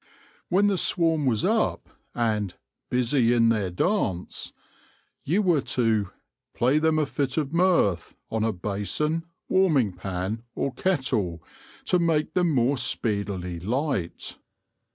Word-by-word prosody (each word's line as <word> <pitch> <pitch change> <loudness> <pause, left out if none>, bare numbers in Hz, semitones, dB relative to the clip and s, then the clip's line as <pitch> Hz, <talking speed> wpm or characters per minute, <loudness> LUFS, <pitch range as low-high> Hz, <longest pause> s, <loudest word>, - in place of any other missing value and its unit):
When 190 +3 +3
the 200 -3 +2
swarm 165 -5 +1
was 110 -4 +1
up, - - +1 0.3
and 105 -5 -1 0.2
" - - -59
busie 125 -1 +2
in 115 -1 +4
their 105 -5 +1
dance," 90 - -1 0.7
you 190 +8 +1
were 170 -6 +3
to 110 -6 0 0.2
" - - -63
play 130 +5 +3
them 160 0 +2
a 155 - +2
fit 140 -1 -2
of 150 -1 -1
mirth 170 - +2 0.2
on 110 -1 0
a 115 - +2
Bason, 105 - -2 0.2
Warming 155 - +3
pan 95 +4 -4
or 135 - -2
Kettle, 125 - -1 0.4
to 180 - +3
make 160 -3 +1
them 180 -2 +2
more 135 -1 +2
speedily 100 -7 -2
light." 120 - -2
125 Hz, 135 wpm, -25 LUFS, 105-160 Hz, 0.7 s, in